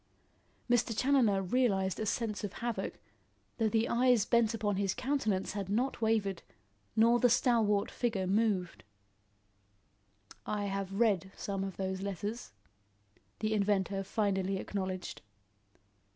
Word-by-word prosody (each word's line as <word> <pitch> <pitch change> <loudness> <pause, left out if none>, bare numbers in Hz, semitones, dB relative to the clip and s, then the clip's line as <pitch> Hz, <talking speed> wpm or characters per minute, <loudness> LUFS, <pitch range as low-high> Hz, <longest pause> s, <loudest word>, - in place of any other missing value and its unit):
Mr. 240 -2 +1
Challoner 240 -8 +3
realised 195 -3 +1
a 220 - -2
sense 215 -1 -2
of 205 - -4
havoc, 235 -1 -3 0.6
though 220 -1 +2
the 225 +1 +1
eyes 245 -3 +3
bent 235 -2 +3
upon 205 -3 -1
his 195 -1 0
countenance 245 -7 -1
had 200 -2 -4
not 240 +5 -1
wavered, 215 -5 +1 0.5
nor 230 +2 +5
the 245 - +4
stalwart 225 -4 +2
figure 220 -6 -1
moved. 195 -2 0 1.6
"I 205 -1 -2
have 195 0 -3
read 195 -5 +2
some 195 -1 -3
of 195 -1 -5
those 190 0 -3
letters," 205 +4 -4 0.9
the 215 0 0
inventor 200 -2 +1
finally 195 -2 0
acknowledged. 185 -2 -4
205 Hz, 125 wpm, -32 LUFS, 195-230 Hz, 1.6 s, nor